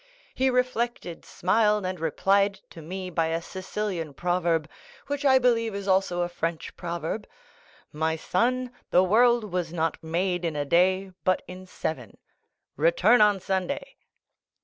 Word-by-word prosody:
He 265 Hz, +1 st, +2 dB
reflected, 240 Hz, -8 st, -1 dB
smiled, 210 Hz, +1 st, +1 dB
and 185 Hz, -1 st, -3 dB
replied 195 Hz, +5 st, +2 dB, 0.2 s
to 165 Hz, -, -10 dB
me 185 Hz, +3 st, -6 dB
by 165 Hz, -1 st, +1 dB
a 165 Hz, +1 st, -1 dB
Sicilian 185 Hz, -3 st, -5 dB
proverb, 175 Hz, -2 st, 0 dB, 0.4 s
which 285 Hz, 0 st, -3 dB
I 265 Hz, -2 st, +6 dB
believe 230 Hz, -4 st, +2 dB
is 200 Hz, 0 st, -5 dB
also 190 Hz, -2 st, +2 dB
a 175 Hz, -, 0 dB
French 165 Hz, -2 st, -4 dB
proverb, 170 Hz, +4 st, -4 dB, 0.7 s
'My 160 Hz, +1 st, 0 dB
son, 245 Hz, +10 st, 0 dB, 0.2 s
the 180 Hz, -, +5 dB
world 225 Hz, +2 st, +3 dB
was 175 Hz, -2 st, -2 dB
not 165 Hz, -2 st, -2 dB
made 175 Hz, +2 st, -1 dB
in 165 Hz, -3 st, -2 dB
a 145 Hz, -1 st, -1 dB
day—but 185 Hz, +3 st, +1 dB
in 185 Hz, +1 st, -10 dB
seven. 130 Hz, -, -5 dB, 0.6 s
Return 175 Hz, -, +4 dB
on 210 Hz, -2 st, +5 dB
Sunday. 190 Hz, +9 st, -3 dB
185 Hz, 140 wpm, -26 LUFS, 170-210 Hz, 0.7 s, I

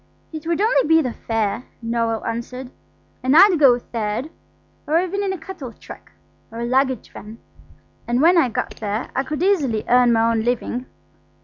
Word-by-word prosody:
"It 315 Hz, 0 st, -7 dB
would 335 Hz, 0 st, 0 dB
only 435 Hz, -5 st, +2 dB
be 325 Hz, +1 st, +5 dB
the 250 Hz, -3 st, -3 dB
fare," 225 Hz, +1 st, -2 dB, 0.2 s
Noël 230 Hz, -1 st, -1 dB
answered; 245 Hz, +3 st, -5 dB, 0.5 s
"and 260 Hz, +4 st, +3 dB
I'd 375 Hz, -2 st, +7 dB
go 260 Hz, -5 st, +6 dB
third, 235 Hz, +4 st, -4 dB, 0.6 s
or 315 Hz, +3 st, +3 dB
even 370 Hz, +3 st, -2 dB
in 395 Hz, -1 st, -1 dB
a 380 Hz, -, -3 dB
cattle 325 Hz, -7 st, -8 dB
truck, -, -, -13 dB, 0.4 s
or 230 Hz, -, -8 dB
a -, -, -2 dB
luggage 260 Hz, 0 st, 0 dB
van. 215 Hz, +2 st, -10 dB, 0.7 s
And 240 Hz, +1 st, +1 dB
when 335 Hz, +5 st, +5 dB
I 325 Hz, -7 st, +4 dB
got 230 Hz, -, -4 dB
there 210 Hz, +1 st, -4 dB
I -, -, +2 dB
could 300 Hz, +4 st, -4 dB
easily 285 Hz, -, +1 dB
earn 245 Hz, 0 st, +4 dB
my 230 Hz, 0 st, +3 dB
own 225 Hz, -1 st, 0 dB
living. 245 Hz, +1 st, -2 dB
250 Hz, 180 wpm, -21 LUFS, 230-320 Hz, 0.7 s, I'd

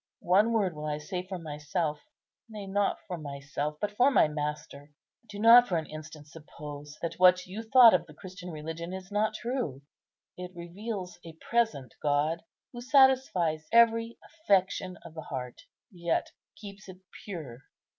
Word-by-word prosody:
One 200 Hz, +6 st, +4 dB
word 200 Hz, -7 st, +1 dB
will 150 Hz, 0 st, -5 dB
I 150 Hz, 0 st, -2 dB
say 180 Hz, +5 st, -4 dB
for 190 Hz, -1 st, -5 dB
myself; 150 Hz, 0 st, -3 dB, 0.5 s
nay, 210 Hz, -2 st, -7 dB
not 200 Hz, +1 st, 0 dB
for 180 Hz, -4 st, -5 dB
myself, 145 Hz, +1 st, -5 dB
but 210 Hz, -, -2 dB
for 245 Hz, +6 st, +4 dB
my 265 Hz, -, +4 dB
Master. 150 Hz, -1 st, -5 dB, 0.4 s
Do 205 Hz, -, -8 dB
not 235 Hz, +3 st, +8 dB
for 175 Hz, -, 0 dB
an 160 Hz, -, -3 dB
instant 155 Hz, -1 st, -10 dB
suppose 150 Hz, -1 st, -10 dB
that 170 Hz, -, -4 dB
what 185 Hz, 0 st, +6 dB
you 195 Hz, +5 st, -6 dB
thought 230 Hz, 0 st, +7 dB
of 175 Hz, -2 st, +1 dB
the 150 Hz, -, -14 dB
Christian 185 Hz, +1 st, -10 dB
religion 160 Hz, +2 st, -6 dB
is 190 Hz, +1 st, -8 dB
not 215 Hz, +1 st, 0 dB
true. 235 Hz, -, -3 dB, 0.6 s
It 180 Hz, 0 st, -8 dB
reveals 180 Hz, +2 st, -6 dB
a 165 Hz, -, -10 dB
present 225 Hz, -, 0 dB
God, 150 Hz, +3 st, +1 dB, 0.3 s
who 240 Hz, -, -7 dB
satisfies 250 Hz, -, +3 dB
every 230 Hz, 0 st, +4 dB
affection 190 Hz, -, 0 dB
of -, -, -10 dB
the 160 Hz, -, -7 dB
heart, 125 Hz, -4 st, -6 dB, 0.3 s
yet 170 Hz, -3 st, -2 dB, 0.3 s
keeps 200 Hz, -2 st, -11 dB
it 185 Hz, 0 st, -12 dB, 0.2 s
pure. 155 Hz, -, -7 dB
180 Hz, 160 wpm, -29 LUFS, 150-210 Hz, 0.6 s, not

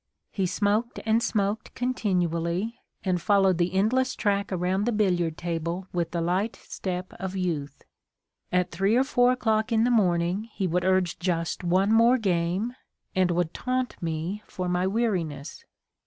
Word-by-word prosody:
He 190 Hz, -2 st, 0 dB
smoked 210 Hz, +5 st, 0 dB
and 225 Hz, +1 st, +3 dB
smoked 210 Hz, -1 st, -1 dB
continually, 185 Hz, -3 st, -1 dB, 0.2 s
and 180 Hz, -3 st, 0 dB
followed 195 Hz, -2 st, +3 dB
the 175 Hz, +1 st, +2 dB
endless 250 Hz, +6 st, +2 dB
track 200 Hz, -1 st, 0 dB
around 185 Hz, +2 st, 0 dB
the 240 Hz, -, +1 dB
billiard 180 Hz, -7 st, +1 dB
table 170 Hz, +1 st, -3 dB
with 175 Hz, -2 st, -1 dB
the 170 Hz, -, -2 dB
light 185 Hz, +6 st, 0 dB
step 185 Hz, -1 st, -5 dB
of 190 Hz, 0 st, -4 dB
youth. 155 Hz, -7 st, -3 dB, 0.7 s
At 180 Hz, 0 st, +1 dB
3 195 Hz, +5 st, +2 dB
or 255 Hz, -, +4 dB
4 250 Hz, -2 st, +3 dB
o'clock 220 Hz, -2 st, 0 dB
in 225 Hz, 0 st, +3 dB
the 245 Hz, -, +2 dB
morning 180 Hz, -2 st, +2 dB
he 195 Hz, -, -2 dB
would 180 Hz, +1 st, 0 dB
urge 185 Hz, -2 st, +2 dB
just 175 Hz, -1 st, -1 dB
one 190 Hz, +4 st, +3 dB
more 230 Hz, +3 st, +6 dB
game, 190 Hz, +2 st, 0 dB, 0.4 s
and 185 Hz, -1 st, +3 dB
would 175 Hz, -1 st, 0 dB
taunt 255 Hz, 0 st, -2 dB
me 165 Hz, +5 st, -3 dB
for 185 Hz, -1 st, -4 dB
my 180 Hz, +1 st, +1 dB
weariness. 185 Hz, -10 st, -2 dB
190 Hz, 155 wpm, -26 LUFS, 175-220 Hz, 0.7 s, more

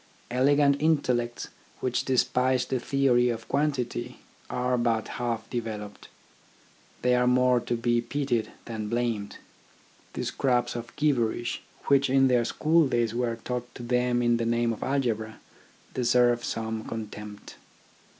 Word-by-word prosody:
Elegant 140 Hz, +2 st, +3 dB
intellects 125 Hz, -7 st, +1 dB, 0.3 s
which 125 Hz, -1 st, -1 dB
despise 130 Hz, 0 st, +2 dB
the 130 Hz, -, -1 dB
theory 125 Hz, -1 st, +2 dB
of 115 Hz, -1 st, -4 dB
quantity, 140 Hz, -4 st, -1 dB, 0.3 s
are 125 Hz, 0 st, 0 dB
but 115 Hz, -2 st, 0 dB
half 115 Hz, -2 st, -2 dB
developed. 110 Hz, -4 st, -5 dB, 1.0 s
They 125 Hz, 0 st, +4 dB
are 125 Hz, 0 st, +3 dB
more 125 Hz, 0 st, +4 dB
to 120 Hz, -, -2 dB
be 120 Hz, 0 st, +1 dB
pitied 120 Hz, -2 st, -1 dB
than 110 Hz, -3 st, -5 dB
blamed. 115 Hz, -3 st, -2 dB, 0.8 s
The -, -, -3 dB
scraps 125 Hz, -3 st, 0 dB
of 120 Hz, -1 st, -7 dB
gibberish, 120 Hz, -6 st, 0 dB, 0.2 s
which 140 Hz, -1 st, +3 dB
in 135 Hz, 0 st, +4 dB
their 120 Hz, -2 st, +3 dB
school 160 Hz, +4 st, +3 dB
days 120 Hz, -3 st, 0 dB
were 120 Hz, -1 st, -1 dB
taught 125 Hz, -1 st, -4 dB
to 120 Hz, -, -8 dB
them 125 Hz, 0 st, +1 dB
in 120 Hz, 0 st, +3 dB
the 115 Hz, -, -1 dB
name 120 Hz, 0 st, +1 dB
of -, -, -9 dB
algebra, 115 Hz, -5 st, -1 dB, 0.5 s
deserve 120 Hz, -1 st, +3 dB
some 110 Hz, -1 st, -3 dB
contempt. 105 Hz, -2 st, -8 dB
120 Hz, 135 wpm, -27 LUFS, 115-130 Hz, 1.0 s, They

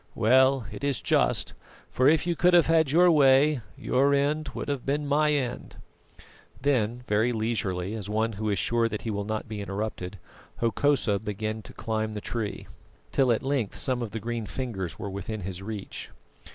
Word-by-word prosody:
Well, 130 Hz, +2 st, +4 dB
it -, -, -8 dB
is 140 Hz, -4 st, 0 dB
just; -, -, +1 dB, 0.4 s
for 130 Hz, +2 st, +4 dB
if 160 Hz, +1 st, +3 dB
you 175 Hz, -1 st, 0 dB
could 175 Hz, +2 st, +4 dB
have 170 Hz, -, +6 dB
had 160 Hz, -3 st, +3 dB
your 175 Hz, +4 st, +5 dB
way, 140 Hz, -1 st, +5 dB, 0.2 s
your 140 Hz, +2 st, +2 dB
end 150 Hz, +2 st, 0 dB
would -, -, -4 dB
have 140 Hz, -3 st, -2 dB
been 145 Hz, +2 st, -1 dB
my 150 Hz, +1 st, +2 dB
end." 130 Hz, -5 st, -2 dB, 0.8 s
Then 125 Hz, -3 st, 0 dB
very 110 Hz, +3 st, +2 dB
leisurely, 105 Hz, -5 st, -1 dB
as 105 Hz, -3 st, -5 dB
one 110 Hz, +1 st, 0 dB
who 110 Hz, +1 st, -3 dB
is 100 Hz, -, 0 dB
sure 115 Hz, +3 st, +1 dB
that 105 Hz, -1 st, -5 dB
he 115 Hz, -, -2 dB
will 100 Hz, -1 st, -3 dB
not 110 Hz, +1 st, -3 dB
be 110 Hz, -2 st, -5 dB
interrupted, 100 Hz, -1 st, -4 dB, 0.4 s
Hokosa 115 Hz, -3 st, +1 dB
began 110 Hz, +1 st, -4 dB
to -, -, -12 dB
climb 110 Hz, -1 st, -3 dB
the -, -, -3 dB
tree, 110 Hz, 0 st, -4 dB, 0.5 s
till 130 Hz, -3 st, +3 dB
at 115 Hz, -, 0 dB
length 135 Hz, -6 st, -1 dB
some 130 Hz, -2 st, 0 dB
of 115 Hz, -, -3 dB
the 110 Hz, +2 st, -5 dB
green 115 Hz, 0 st, -4 dB
fingers 95 Hz, -, -4 dB
were 105 Hz, -, -5 dB
within 100 Hz, +2 st, -5 dB
his 95 Hz, 0 st, -5 dB
reach. 105 Hz, 0 st, -6 dB
115 Hz, 185 wpm, -27 LUFS, 105-140 Hz, 0.8 s, have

